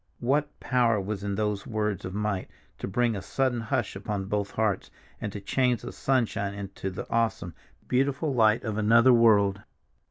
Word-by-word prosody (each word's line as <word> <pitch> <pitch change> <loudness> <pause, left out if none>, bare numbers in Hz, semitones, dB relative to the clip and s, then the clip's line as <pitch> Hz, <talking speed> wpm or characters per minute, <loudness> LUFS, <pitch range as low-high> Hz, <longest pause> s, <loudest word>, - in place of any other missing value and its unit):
What 145 +4 0
power 120 -4 +2
was 100 0 -4
in 100 -1 -2
those 105 -1 -2
words 105 -3 -2
of 95 +1 -6
might 105 -3 -2 0.3
to - - -4
bring 115 +3 +1
a 100 - -4
sudden 130 +2 0
hush 120 -1 -2
upon 100 0 -3
both 100 0 -1
hearts, 110 -3 -1 0.3
and 105 - -3
to 100 - -6
change 125 +3 0
the 120 - -6
sunshine 110 -6 0
into 100 -1 -5
the 95 - -6
awesome, 115 -7 0 0.3
beautiful 140 +3 +1
light 110 -2 +3
of 110 -2 -2
another 115 +4 +6
world? 105 -4 +4
110 Hz, 170 wpm, -27 LUFS, 100-120 Hz, 0.3 s, another